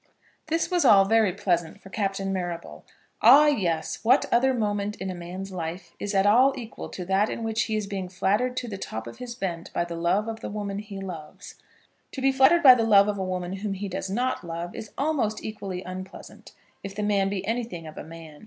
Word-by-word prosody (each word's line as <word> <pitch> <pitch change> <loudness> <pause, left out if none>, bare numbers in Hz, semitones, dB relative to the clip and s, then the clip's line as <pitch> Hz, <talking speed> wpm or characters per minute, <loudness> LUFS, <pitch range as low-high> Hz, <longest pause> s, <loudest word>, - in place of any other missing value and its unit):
This 330 +3 0
was 355 -1 +2
all 200 -7 +7
very 220 -1 +3
pleasant 170 -3 -1
for 195 - -14
Captain 195 -2 -2
Marrable. 175 -2 -5 0.4
Ah, 295 +2 +8
yes! 175 - 0
what 250 +5 +4
other 265 +3 +4
moment 210 -3 -1
in 190 0 -5
a - - -4
man's 180 +2 -7
life 175 0 -6
is 205 0 -3
at 195 0 +3
all 255 +6 +5
equal 230 -3 -7
to 180 - -6
that 195 +3 +2
in 230 - -4
which 225 0 0
he 220 - -2
is 215 -1 -1
being 195 -2 -5
flattered 210 +7 0
to 245 - -2
the 200 -4 -6
top 110 -9 -5
of 120 - -10
his 245 -1 -6
bent 175 -7 -4
by 170 - 0
the 170 - -6
love 175 +6 +1
of 225 0 -5
the - - -6
woman 200 -1 -4
he 205 -2 -8
loves. 170 -6 -8 0.6
To - - -5
be 270 0 +4
flattered 275 +6 +5
by 260 -3 +11
the 240 -2 +1
love 205 -2 +6
of 205 -1 -2
a - - -1
woman 185 0 -3
whom 200 0 -3
he 200 +1 -4
does 190 0 -4
not 250 +4 -1
love 170 +1 -5
is 215 - -7
almost 270 -8 0
equally 195 -4 -5
unpleasant, 185 +1 -9 0.3
if 195 0 -7
the 210 - -2
man 200 -2 +2
be 195 -1 -3
anything 225 -6 -3
of 155 - -9
a - - -7
man. 160 -2 -11
200 Hz, 225 wpm, -26 LUFS, 180-225 Hz, 0.6 s, by